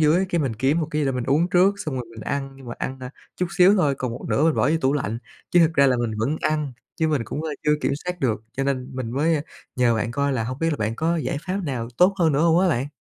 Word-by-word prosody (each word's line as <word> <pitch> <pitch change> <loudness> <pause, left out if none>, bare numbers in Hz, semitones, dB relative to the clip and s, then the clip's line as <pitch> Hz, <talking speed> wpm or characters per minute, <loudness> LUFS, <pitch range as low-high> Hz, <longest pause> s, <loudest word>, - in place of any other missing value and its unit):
dưới 160 +5 +3
cái 175 - 0
mình 130 -6 -1
kiếm 135 +8 +1
một 160 - -1
cái 150 0 0
gì 140 - +1
đó 135 - +1
mình 125 -2 -2
uống 150 +6 +2
trước, 185 +3 +4
xong 155 -7 -4
rồi 125 -1 -3
mình 115 -1 -10
ăn 135 +3 -3
nhưng 135 - -13
mà 120 - -5
ăn, 130 0 -4
a, 125 -1 -6 0.3
chút 180 - 0
xíu 185 +3 +7
thôi, 150 -7 +2
còn 130 -2 -3
một 120 - -8
nửa 145 - +2
mình 160 -1 +3
bỏ - - +2
vô 165 - +3
tủ 135 -2 +2
lạnh, 115 -6 -2 0.3
chứ 175 - +4
thật 165 -1 +5
ra 140 -1 +5
là 130 -2 +3
mình 120 -1 -1
vẫn 135 +8 0
ăn, 150 -3 -1 0.2
chứ 160 -1 +1
mình 150 -5 +1
cũng, 150 - -5
ơ, 160 - -3 0.2
chưa 150 - +4
kiểm - - 0
soát 180 -1 -4
được. 110 -4 0
Cho 135 - -2
nên 130 -2 -1
mình 130 -3 -4
mới, 150 +6 +1
a, 145 - -1 0.3
nhờ 120 -2 +3
bạn 115 +1 -1
coi 140 +3 0
là 115 -4 -1
hông 130 +3 -5
biết 165 +1 +1
là 150 - -1
bạn 110 -1 -2
có 165 +2 +1
giải 155 - -2
pháp 185 +2 -1
nào 125 -6 -3
tốt 185 +2 +5
hơn 160 -3 +3
nữa 140 - +1
hông 165 0 +4
á 185 - +3
bạn? 130 -4 0
140 Hz, 315 wpm, -23 LUFS, 125-160 Hz, 0.3 s, xíu